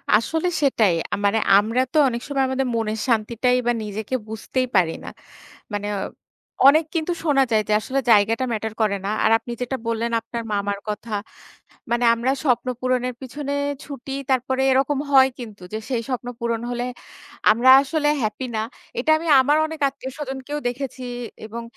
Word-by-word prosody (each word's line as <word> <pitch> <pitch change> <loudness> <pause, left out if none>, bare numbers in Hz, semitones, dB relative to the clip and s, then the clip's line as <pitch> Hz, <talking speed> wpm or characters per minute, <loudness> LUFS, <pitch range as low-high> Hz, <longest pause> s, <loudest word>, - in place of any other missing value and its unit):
আসলে 320 +10 +1
সেটাই। 220 -10 +3 0.2
আ - - +3
মানে 205 +2 +3 0.2
আমরা 225 +5 +2
তো - - +1
অনেক 235 -2 -2
সময় 275 -2 0
আমাদের 265 0 0
মনের 220 -1 -1
শান্তিটাই 235 +2 +1
বা - - +4
নিজেকে 215 +4 -4
বুঝতেই 225 +4 -2
পারি 175 -4 +4
না। - - -10 0.7
মানে 205 0 -2 0.8
অনেক 310 +3 +6
কিন্তু 330 +2 0
শোনা 285 -3 +4
যায় 215 -1 +4
যে, 215 - -2
আসলে 265 +5 -1
জায়গাটা 225 +4 +4
ম্যাটার 220 -1 -3
করে 205 -2 +2
না। - - -1 0.2
আর - - +4
আপনি 230 +1 -9
যেটা 260 +2 -2
বললেন 230 +1 -1
আপনার 230 +1 -6
মামার 200 0 -1
কথা, 215 +2 -5 0.8
মানে 240 +1 +2
আমরা 240 +3 0
স্বপ্ন 255 -3 +1
পূরণের 255 0 0
পিছনে 280 +2 -5 0.3
ছুটি, 275 -2 -7 0.2
তারপরে 260 0 +1
এরকম 270 +2 +2
হয় 265 -1 +7
কিন্তু 215 -5 -9
যে, 220 - -2
সেই 245 -3 0
স্বপ্ন 250 -1 -3
পূরণ 235 -1 -1
হলে 245 0 -2 0.7
আমরা 235 +4 +3
আসলে 295 +2 -1
হ্যাপি 215 +3 -2
না। 215 - 0 0.4
এটা 285 +6 +2
আমি 330 +1 -6
আমার 290 +3 +3
অনেক 320 0 -7
আত্মীয়স্বজনকেও 270 +1 -6
দেখেছি 255 +1 -5 0.4
এবং 230 +2 -7
245 Hz, 165 wpm, -22 LUFS, 220-270 Hz, 0.8 s, হয়